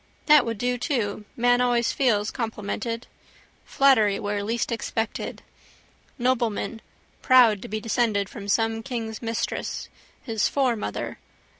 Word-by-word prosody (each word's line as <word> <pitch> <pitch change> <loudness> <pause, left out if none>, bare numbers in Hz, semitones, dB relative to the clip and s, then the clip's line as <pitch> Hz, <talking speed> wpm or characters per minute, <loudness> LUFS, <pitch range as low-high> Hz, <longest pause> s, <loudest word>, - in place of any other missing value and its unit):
That 300 -5 +6
would 230 -1 -2
do 245 +2 -1
to: 215 -7 -2
man 245 +1 +3
always 240 -1 +2
feels 215 -6 +1
complimented. 230 +1 -4 0.6
Flattery 220 -8 +4
where 205 -1 -2
least 230 +3 -1
expected. 225 -1 -3 0.7
Nobleman 235 -3 0 0.4
proud 240 -6 +5
to - - -7
be 215 +1 -3
descended 215 -2 0
from 200 -2 -9
some 225 +2 +1
king's 225 -3 -5
mistress. 230 -1 -3 0.3
His 225 -4 0
foremother. 240 - -1
230 Hz, 120 wpm, -25 LUFS, 210-245 Hz, 0.7 s, That